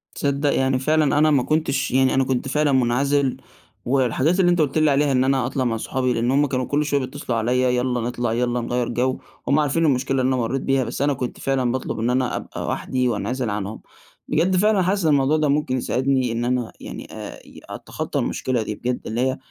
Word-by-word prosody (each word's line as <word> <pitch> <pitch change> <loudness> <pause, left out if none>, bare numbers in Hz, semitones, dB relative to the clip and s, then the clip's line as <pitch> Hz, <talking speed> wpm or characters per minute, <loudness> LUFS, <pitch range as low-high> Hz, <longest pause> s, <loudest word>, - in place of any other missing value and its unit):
تصدّق 140 0 0
يعني 130 -1 +1
فعلًا 155 +1 +2
أنا 155 +1 +4
ما 135 -4 +3
كنتش 140 -3 0
يعني 130 0 +3
أنا 135 - +3
كنت 130 0 -1
فعلًا 150 +2 +1
مُنعزِل، 135 +2 +1 0.5
والحاجات 135 +7 +1
اللي 175 -1 +4
أنت 175 - +2
قُلت 145 -1 0
لي 155 -1 +4
عليها 140 +1 +2
إن 130 -1 +3
أنا 135 -2 +1
أطلع 130 0 -1
مع 115 -1 0
صحابي 130 +2 -1
لإن 120 +2 0
هم 145 +2 +3
كانوا 130 -2 -1
كل 150 +1 0
شوية 145 -1 +1
بيتّصلوا 130 -3 -4
عليّا 125 +3 +1
يالّا 125 -1 0
نطلع، 120 -1 -2
يالّا 120 +1 0
نغيّر 120 0 -1
جَو. 130 +2 -1 0.3
هم 140 +2 +3
عارفين 150 +3 +1
المشكلة 135 -1 +1
اللي 130 - +1
أنا 130 - +1
مرّيت 125 +3 -1
بيها، 135 -1 +1
بس 125 - -5
أنا 145 0 +2
كنت 125 -2 -5
فعلًا 130 -3 0
باطلُب 125 -3 -3
إن 115 +2 0
أنا 125 0 0
أبقى - - -6
وحدي 125 -1 -1
وانعزِل 120 +3 -2
عنهم. 105 +1 -4 0.5
بجد 175 +5 +1
فعلًا 205 +1 +3
حاسِس 190 0 0
إن 155 - +4
الموضوع 145 +1 +3
ده 150 - +1
ممكن 140 -2 0
يساعدني 130 0 0
إن 120 +1 -2
أنا 125 -2 -1
يعني - - -8
آآ - - -8 0.3
أتخطّى - - -4
المشكلة 125 -3 -1
دي 105 - -4
بجد 125 +2 -2
اللي 115 +2 -2
هي 130 0 0
130 Hz, 215 wpm, -22 LUFS, 125-145 Hz, 0.5 s, أنا